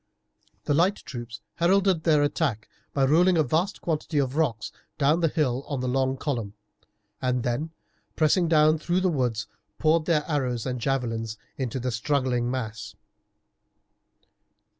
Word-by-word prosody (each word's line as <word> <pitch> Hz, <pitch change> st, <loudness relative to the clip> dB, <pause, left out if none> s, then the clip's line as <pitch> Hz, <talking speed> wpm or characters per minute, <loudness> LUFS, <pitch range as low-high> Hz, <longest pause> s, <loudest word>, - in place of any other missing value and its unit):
The -, -, 0 dB
light 180 Hz, +7 st, +3 dB
troops 120 Hz, -, -8 dB, 0.2 s
heralded 185 Hz, -1 st, +2 dB
their 150 Hz, -3 st, +4 dB
attack 145 Hz, -7 st, -1 dB, 0.2 s
by 135 Hz, -1 st, +2 dB
rolling 175 Hz, +6 st, +4 dB
a 155 Hz, -, +4 dB
vast 160 Hz, +8 st, -1 dB
quantity 160 Hz, -1 st, -2 dB
of 135 Hz, -1 st, 0 dB
rocks 135 Hz, -9 st, 0 dB, 0.3 s
down 150 Hz, +3 st, +3 dB
the 165 Hz, -, +3 dB
hill 140 Hz, -5 st, 0 dB
on 140 Hz, -3 st, -3 dB
the 130 Hz, -, -2 dB
long 130 Hz, +1 st, 0 dB
column, 115 Hz, -8 st, -3 dB, 0.7 s
and 125 Hz, -2 st, 0 dB
then, 125 Hz, +7 st, -1 dB, 0.5 s
pressing 165 Hz, +3 st, +3 dB
down 155 Hz, -1 st, +4 dB
through 175 Hz, +4 st, 0 dB
the 185 Hz, -, +2 dB
woods, 120 Hz, -7 st, -1 dB, 0.3 s
poured 155 Hz, 0 st, +2 dB
their 155 Hz, -3 st, +1 dB
arrows 130 Hz, -7 st, -1 dB
and 125 Hz, -2 st, -3 dB
javelins 115 Hz, -4 st, -2 dB, 0.2 s
into 130 Hz, -1 st, -3 dB
the 125 Hz, +1 st, -2 dB
struggling 125 Hz, -1 st, 0 dB
mass. 110 Hz, -4 st, -5 dB
140 Hz, 145 wpm, -26 LUFS, 125-160 Hz, 0.7 s, their